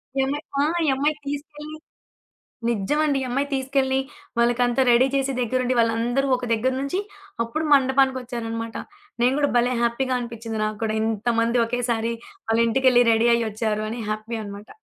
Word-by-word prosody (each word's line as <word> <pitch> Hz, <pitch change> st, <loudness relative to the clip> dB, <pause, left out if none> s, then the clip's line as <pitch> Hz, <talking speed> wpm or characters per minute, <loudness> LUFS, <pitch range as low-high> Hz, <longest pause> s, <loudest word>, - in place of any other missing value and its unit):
ఈ 270 Hz, -, 0 dB
అమ్మాయి 290 Hz, +3 st, -3 dB, 0.2 s
ఆ! -, -, +3 dB, 0.2 s
ఈ -, -, 0 dB
అమ్మాయి 295 Hz, +3 st, +1 dB
తీసుకెళ్ళి 295 Hz, +1 st, -6 dB, 0.9 s
నిజ్జమండి. 280 Hz, +7 st, +1 dB
ఈ -, -, -2 dB
అమ్మాయి 275 Hz, +3 st, 0 dB
తీసుకెళ్ళి, 265 Hz, 0 st, 0 dB, 0.4 s
వాళ్ళకంతా 240 Hz, +2 st, +2 dB
రెడీ 240 Hz, +2 st, +5 dB
చేసి 270 Hz, 0 st, +1 dB
దెగ్గరుండి 255 Hz, +1 st, 0 dB
వాళ్ళందరూ 235 Hz, +4 st, +1 dB
ఒక 250 Hz, -, -6 dB
దెగ్గర 240 Hz, +4 st, +1 dB
నుంచి 280 Hz, +7 st, -2 dB, 0.5 s
అప్పుడు 310 Hz, +8 st, -3 dB
మండపానికొచ్చారనమాట. 250 Hz, -4 st, +1 dB, 0.5 s
నేను 255 Hz, +2 st, +4 dB
కూడా 285 Hz, -, +2 dB
భలే 245 Hz, +1 st, +3 dB
హ్యాపీగా 255 Hz, +2 st, 0 dB
అనిపిచ్చింది 230 Hz, -2 st, -5 dB
నాకు 215 Hz, -1 st, -3 dB
కూడా. 215 Hz, 0 st, -1 dB
ఇంతమంది 230 Hz, +2 st, +1 dB
ఒకేసారి 235 Hz, -1 st, -1 dB, 0.4 s
వాళ్ళ 225 Hz, 0 st, +2 dB
ఇంటికెళ్ళ 255 Hz, 0 st, +4 dB
రెడీ 225 Hz, +1 st, +3 dB
అయ్యి 230 Hz, -1 st, 0 dB
ఒచ్చారు 215 Hz, 0 st, -2 dB
అని 235 Hz, +2 st, -5 dB
హ్యాపీ 215 Hz, +2 st, -4 dB
అనమాట. 200 Hz, +1 st, -9 dB
245 Hz, 150 wpm, -23 LUFS, 230-270 Hz, 0.9 s, రెడీ